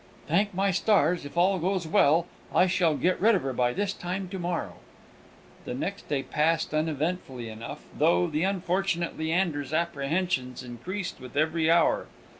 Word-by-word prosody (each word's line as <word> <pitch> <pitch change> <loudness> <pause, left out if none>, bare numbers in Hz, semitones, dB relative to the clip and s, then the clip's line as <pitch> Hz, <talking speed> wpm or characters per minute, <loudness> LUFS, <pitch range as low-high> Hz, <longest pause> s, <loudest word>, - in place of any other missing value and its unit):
"Thank 195 +5 +1
my 195 +1 +2
stars, 180 -5 +2
if 145 - -9
all 185 +2 +3
goes 185 0 -1
well, 160 +1 +4 0.3
I 180 - +6
shall 175 -4 +2
get 180 0 +1
rid 220 +2 +5
of 185 - -1
her 135 -1 -2
by 120 0 +1
this 200 +6 -1
time 185 +1 -4
to 190 0 -5
morrow!" 175 -1 -3 0.9
The 125 - -4
next 195 +9 -4
day 140 -2 0
passed 160 +1 0
uneventfully 155 -5 -2
enough, 110 +1 -8
though 90 0 +3
the 155 - -2
unfortunate 185 -2 0
Leander's 160 -3 -1
apprehensions 150 -4 -1
increased 175 - -5
with 130 +2 -9
every 160 +1 +2
hour. 165 0 +3
170 Hz, 160 wpm, -27 LUFS, 145-185 Hz, 0.9 s, I